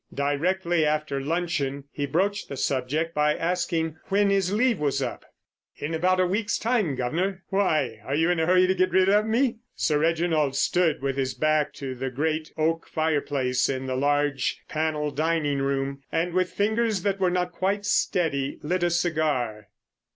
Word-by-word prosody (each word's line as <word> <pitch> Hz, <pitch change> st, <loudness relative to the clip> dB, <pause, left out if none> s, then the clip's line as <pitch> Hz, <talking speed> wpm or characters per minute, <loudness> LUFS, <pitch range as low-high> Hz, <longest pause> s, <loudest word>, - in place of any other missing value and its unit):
Directly 170 Hz, +4 st, +1 dB
after 150 Hz, -2 st, 0 dB
luncheon 150 Hz, -3 st, -2 dB
he 145 Hz, -1 st, -3 dB
broached 195 Hz, +8 st, 0 dB
the 140 Hz, -, -5 dB
subject 140 Hz, +6 st, -1 dB
by 150 Hz, 0 st, +2 dB
asking 165 Hz, -2 st, -1 dB
when 200 Hz, 0 st, +2 dB
his 195 Hz, -2 st, +1 dB
leave 230 Hz, +1 st, +2 dB
was 145 Hz, -2 st, 0 dB
up. -, -, -4 dB, 0.5 s
"In 150 Hz, +3 st, -4 dB
about 185 Hz, +3 st, +2 dB
a 185 Hz, -, +4 dB
week's 205 Hz, +4 st, 0 dB
time, 220 Hz, -, 0 dB
guv'nor! 175 Hz, +10 st, -2 dB
Why, 155 Hz, -, +1 dB
are 135 Hz, -, -2 dB
you 165 Hz, +3 st, +2 dB
in 175 Hz, -, 0 dB
a 160 Hz, -, +1 dB
hurry 185 Hz, 0 st, +5 dB
to 185 Hz, -, +2 dB
get 185 Hz, 0 st, +2 dB
rid 190 Hz, 0 st, +4 dB
of 210 Hz, +2 st, +3 dB
me?" 235 Hz, +2 st, +1 dB, 0.2 s
Sir 150 Hz, -2 st, +1 dB
Reginald 160 Hz, -3 st, +1 dB
stood 160 Hz, +1 st, +1 dB
with 135 Hz, -1 st, -1 dB
his 130 Hz, -2 st, -1 dB
back 155 Hz, -1 st, +1 dB
to 135 Hz, -2 st, -5 dB
the 130 Hz, +1 st, -4 dB
great 155 Hz, +4 st, -2 dB
oak 165 Hz, +1 st, 0 dB
fireplace 145 Hz, -5 st, 0 dB
in 130 Hz, -1 st, -2 dB
the 130 Hz, -1 st, -2 dB
large 145 Hz, +1 st, 0 dB
panel 155 Hz, -1 st, -1 dB
dining 150 Hz, -1 st, 0 dB
room, 135 Hz, 0 st, -1 dB
and 170 Hz, +2 st, 0 dB
with 185 Hz, 0 st, +1 dB
fingers 220 Hz, -1 st, 0 dB
that 200 Hz, -1 st, 0 dB
were 185 Hz, -1 st, +3 dB
not 180 Hz, 0 st, -1 dB
quite 195 Hz, +3 st, -1 dB
steady 140 Hz, -10 st, 0 dB
lit 180 Hz, +4 st, -1 dB
a 175 Hz, -, +2 dB
cigar. 150 Hz, -11 st, -1 dB
160 Hz, 175 wpm, -25 LUFS, 140-185 Hz, 0.5 s, hurry